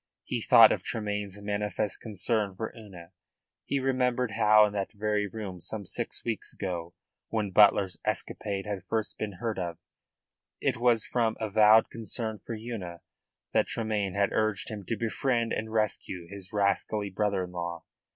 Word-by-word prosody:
He - - -3
thought - - +8
of - - 0
Tremayne's 105 -3 -3
manifest 105 0 -2
concern 105 -1 -1
for 110 +3 -4
Una; 95 -6 -12 0.5
he 140 - 0
remembered 125 -2 +1
how 105 0 +6
in 105 - -3
that 100 -2 -2
very 105 -1 0
room 100 -3 -6
some 100 +4 -4
six - - -3
weeks 115 -2 -2
ago, 85 -3 -5 0.3
when 105 -3 -1
Butler's 100 -2 +5
escapade 100 -2 -2
had 100 -3 -4
first 110 +2 -2
been 105 -2 -3
heard 110 +3 -3
of, 85 -2 -3 0.8
it - - 0
was 120 -2 +3
from 115 -3 0
avowed 110 0 +5
concern 110 -1 -4
for 115 - -5
Una 105 -7 -6 0.5
that - - +3
Tremayne 105 -4 -2
had 100 -1 +2
urged 110 -3 0
him 105 -2 -6
to 115 - -2
befriend 115 +1 0
and 110 0 -3
rescue 105 -5 -1
his 95 0 -7
rascally 100 0 0
brother 100 -1 0
in 90 - -7
law. 85 -1 -4
105 Hz, 160 wpm, -29 LUFS, 95-110 Hz, 0.8 s, thought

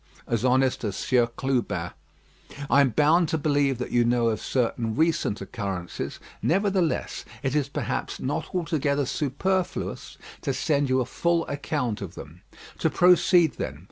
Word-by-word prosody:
"As 115 -1 -1
honest 130 0 +2
as 100 -3 -2
Sieur 125 -2 +2
Clubin. 125 +1 -2 0.8
"I 140 - +6
am 140 - +4
bound 155 +6 +3
to 160 - +1
believe 145 -3 +1
that 125 - -5
you 120 - +3
know 120 -1 +2
of 110 -2 -2
certain 115 -3 -1
recent 160 -8 +1
occurrences; 95 -6 -5 0.2
nevertheless, 190 -1 0 0.2
it 135 -1 0
is, 145 -2 0
perhaps, - - -3
not 140 +6 -3
altogether 150 -5 0
superfluous 175 +7 -2 0.2
to - - -1
send 145 -3 +1
you 130 0 +3
a - - -1
full 170 +6 0
account 140 -6 -2
of 95 -2 -7
them. 80 +5 -11 0.4
"To - - +2
proceed 175 -2 +4
then. - - -4
140 Hz, 150 wpm, -26 LUFS, 120-160 Hz, 0.8 s, I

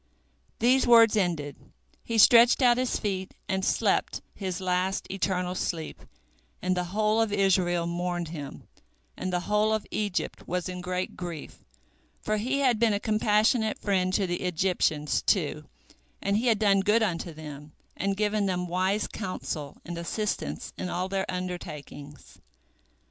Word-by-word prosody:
These 255 +3 +3
words 230 -2 +7
ended, 165 -8 -1 0.5
he 230 - -2
stretched 235 +4 +7
out 240 -1 +5
his 255 -1 0
feet, 190 -3 -3
and 190 -1 -1
slept - - +1
his 185 -3 -4
last 185 +1 -1
eternal 185 -2 -1
sleep, 165 -3 -4 0.6
and 185 0 0
the 180 0 -1
whole 215 +4 +1
of 225 -2 0
Israel 185 -4 +2
mourned 175 -1 -2
him, 145 -4 -8 0.5
and 185 - -4
the 180 -1 0
whole 210 +3 +1
of 220 -1 0
Egypt 205 -4 -3
was 180 0 -2
in 180 -1 -5
great 180 0 -3
grief, 175 -4 -7 0.6
for 215 0 -1
he 260 +6 -1
had 250 -5 +3
been 225 -2 +3
a 200 - 0
compassionate 215 +1 +2
friend 185 -3 0
to 200 - +2
the 175 -1 -3
Egyptians, 170 -4 0
too, - - 0 0.5
and 200 0 0
he 240 +3 0
had 225 -3 +4
done 200 -2 +3
good 210 +4 +3
unto 175 -4 -2
them, 150 -1 -10 0.2
and 195 +1 -1
given 210 -1 +1
them 180 -1 -1
wise 185 +4 0
counsel 155 -8 -5
and 170 0 -5
assistance 170 - -3
in 180 - -3
all 180 +2 -2
their 195 0 -2
undertakings. 150 -6 -7
185 Hz, 155 wpm, -27 LUFS, 175-215 Hz, 0.6 s, words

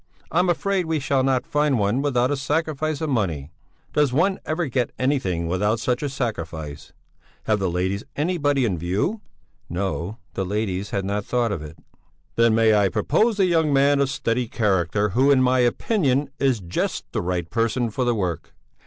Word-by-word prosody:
I'm 180 +2 +2
afraid 185 0 0
we 160 -1 0
shall 135 -1 +1
not 130 -1 +1
find 150 -2 +1
one 105 +5 +1
without 130 -2 +1
a - - +2
sacrifice 155 +2 -1
of 160 - -1
money 85 - -1 0.4
does 150 -3 +3
one 185 +9 +2
ever 165 +2 0
get 125 -3 -1
anything 110 - 0
without 105 +6 0
such 125 +2 -1
a 145 - -1
sacrifice? 80 - -5 0.5
Have 110 -1 +1
the 95 -2 0
ladies 95 +4 -1
anybody 145 -4 +1
in 95 -7 -1
view?" 100 - -1 0.5
No, 95 +2 -3 0.2
the 95 - -2
ladies 100 0 -2
had 100 -1 -2
not 100 +1 -1
thought 120 -1 0
of 95 - -3
it. 75 +1 -10 0.6
"Then 115 -1 +4
may 110 -1 +4
I 100 -2 +3
propose 200 - +1
a 190 - +5
young 165 -4 +2
man 140 +1 +4
of 140 -1 +2
steady 125 -4 -1
character, 105 -2 +1
who 130 +8 +3
in 135 -2 +5
my 130 0 +3
opinion 140 - +1
is 130 -6 +1
just 85 0 -2
the - - -1
right 90 -1 -2
person 115 +3 0
for 130 - -1
the 120 -1 +1
work? 90 -6 -3
120 Hz, 180 wpm, -23 LUFS, 100-145 Hz, 0.6 s, a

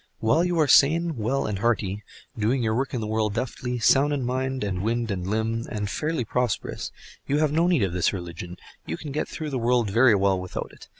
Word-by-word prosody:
While 115 +10 +2
you 175 -2 0
are 155 - +4
sane, 160 +4 +4
well 125 +4 -1
and 100 -2 -2
hearty, 105 -3 0 0.3
doing 120 +4 0
your 110 -1 +1
work 130 +3 -1
in 120 - -2
the - - -3
world 110 -1 -1
deftly, 125 +1 -3
sound 135 +5 +4
in 135 -3 -1
mind, 130 0 -2
and 95 -3 -2
wind, 115 +1 -1
and 90 -2 -3
limb, 110 +2 -1
and 105 -2 -3
fairly 150 +3 -2
prosperous, 125 0 -2 0.4
you 145 - +1
have 155 -1 +2
no 165 +3 +2
need 170 - +3
of 95 -3 -1
this 90 -1 +2
religion—you 85 -1 -8
can 150 - -7
get 150 - -2
through 155 -2 -5
the 130 - -1
world 120 -3 +1
very 115 +1 +5
well 95 -1 +2
without 90 0 -5
it. - - -15
115 Hz, 220 wpm, -25 LUFS, 105-135 Hz, 0.4 s, very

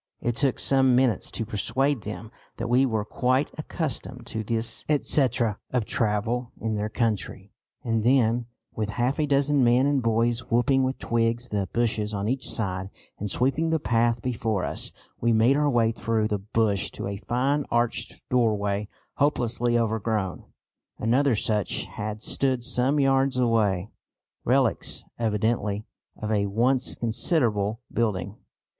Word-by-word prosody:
It 120 -1 -1
took 135 -1 +1
some 130 -2 +3
minutes 125 -5 +2
to 115 - -4
persuade 120 +5 0
them 110 +1 -7 0.3
that - - -3
we 130 +2 +4
were 110 -3 -1
quite 130 +5 0
accustomed 135 -6 -4
to 110 0 -4
this 115 +1 -2
etcetera 125 -7 +2
of 125 -4 0
travel 115 +3 -1
in 110 -1 -2
their 105 0 -2
country, 105 -4 -2 0.3
and 115 -2 0
then, 120 -1 +3 0.3
with 110 -1 -2
half 125 +5 0
a 150 - +1
dozen 140 0 +3
men 120 +2 +4
and 140 -2 +2
boys 115 +1 0
whipping 135 +3 +3
with 130 +1 -1
twigs 115 +1 0
the 100 -2 -2
bushes 110 -3 0
on 100 +1 -2
each 130 +3 -1
side, 95 -3 -2 0.3
and 105 - -3
sweeping 135 - +1
the 160 0 +1
path 115 -2 +1
before 110 -6 -1
us, - - -1 0.3
we 120 - +2
made 115 +4 +4
our 145 0 +2
way 115 -4 +3
through 110 0 0
the 105 -2 -1
bush 105 -1 0
to - - -5
a 100 0 -3
fine 125 +8 0
arched 120 0 -1
doorway 105 -4 +1 0.3
hopelessly 120 -4 +1
overgrown. 110 -4 -1 0.5
Another 125 +3 +2
such 105 -1 0
had 105 +1 -6
stood 130 -3 +1
some 130 +4 +1
yards 135 -1 +2
away, 110 -6 +1 0.5
relics - - +1
evidently 110 -1 0 0.3
of 110 0 -4
a 100 -1 +1
once 125 +6 +1
considerable 115 - 0
building. 100 -4 -1
115 Hz, 150 wpm, -26 LUFS, 105-130 Hz, 0.5 s, we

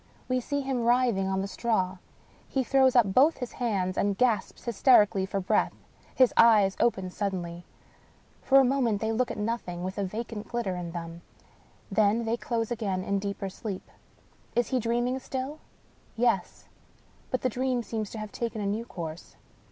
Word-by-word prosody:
We 255 0 +1
see 285 +3 -2
him 265 -3 -1
writhing 235 -5 +2
on 190 0 0
the - - -3
straw. 195 -4 -1 0.5
He 265 - 0
throws 265 0 +3
up 215 -6 +4
both 285 +9 +5
his 250 -2 -5
hands 195 -7 -1
and 200 -1 +1
gasps 230 -3 0
hysterically 210 -4 +4
for 195 - -2
breath. 185 - +1 0.4
His 255 -2 +5
eyes 210 -4 +6
open 190 -6 +1
suddenly. 175 -4 -4 0.7
For 270 +1 +5
a - - +6
moment 245 -5 +1
they 220 +1 -1
look 245 +3 0
at - - -5
nothing, 210 -5 -3
with 190 +2 -4
a - - 0
vacant 215 +2 -5
glitter 235 -6 -2
in 175 -1 -5
them 170 -1 -6 0.4
— - - -18
^then 215 +2 +3
they 225 +1 +1
close 235 -1 -2
again 200 -6 -2
in 200 +1 0
deeper 200 0 -4
sleep. 195 0 -7 0.6
Is 240 0 +1
he 260 - +1
dreaming 240 +3 0
still? 265 +3 -5 0.6
Yes; 230 -5 0 0.6
but 255 - -1
the 255 - +2
dream 250 0 -1
seems 220 -2 -4
to - - -8
have 215 -1 -6
taken 230 -2 -3
a 205 - -2
new 210 +4 -1
course. 165 -5 -7
220 Hz, 175 wpm, -28 LUFS, 195-245 Hz, 0.7 s, eyes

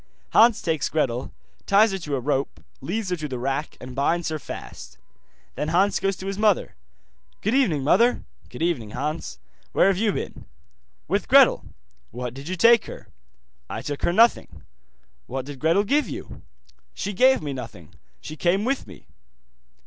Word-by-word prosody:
Hans 225 0 +5
takes 160 -3 -1
Gretel, 130 -5 -1 0.4
ties 210 +2 +5
her 195 - -3
to 150 -5 -3
a - - -1
rope, 135 +1 -2 0.2
leads 190 +7 -3
her - - +2
to 155 -2 -4
the 130 -3 -5
rack, 135 +4 -3
and 125 0 -9
binds 165 +5 0
her 155 -1 -3
fast. - - -9 0.6
Then 150 - -3
Hans 185 +5 +2
goes 195 0 0
to 190 - -9
his 195 +1 -4
mother. 210 -3 +2 0.7
'Good 215 - 0
evening, 195 - +2
mother.' 230 - +3 0.3
'Good - - -6
evening, 145 -11 -1
Hans. 135 - -4 0.4
Where - - +4
have 190 -1 0
you 215 -1 +2
been?' - - -6 0.6
'With - - -1
Gretel.' - - +5 0.4
'What 125 +1 -6
did 135 +3 -9
you 185 - -2
take 230 +4 +5
her?' - - -10 0.6
'I - - -5
took 145 -1 -5
her - - +1
nothing.' 230 +6 +2 0.6
'What 130 0 -4
did 140 -1 -9
Gretel 165 +7 +3
give 290 +8 +1
you?' - - -8 0.5
'She 205 - -4
gave 260 +7 +4
me 145 -2 -3
nothing, 115 - -9 0.3
she 155 - -8
came 185 +6 +1
with 270 - -1
me. 95 -5 -14
165 Hz, 170 wpm, -24 LUFS, 135-205 Hz, 0.7 s, Hans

